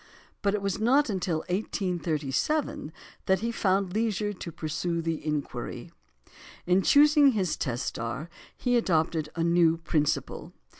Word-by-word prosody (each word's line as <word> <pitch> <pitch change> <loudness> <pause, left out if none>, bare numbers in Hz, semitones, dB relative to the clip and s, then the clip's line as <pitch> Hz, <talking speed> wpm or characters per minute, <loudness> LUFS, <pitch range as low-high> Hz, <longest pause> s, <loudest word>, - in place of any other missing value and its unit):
But 200 -1 +1
it 205 - -3
was 195 -1 -1
not 250 +3 +3
until 175 -4 -1
1837 180 - -2 0.4
that 190 0 +3
he 230 +1 -1
found 190 -4 0
leisure 210 -1 0
to 180 -3 -7
pursue 160 +2 -3
the 165 -1 -3
inquiry. 150 -2 -4 0.7
In 180 +2 +3
choosing 290 - +6
his 190 -6 0
test 125 -3 -3
star 120 +7 -4 0.3
he 245 -1 +1
adopted 160 -7 +1
a 165 - -1
new 170 -1 +4
principle. 155 -3 -1
180 Hz, 135 wpm, -27 LUFS, 160-215 Hz, 0.7 s, choosing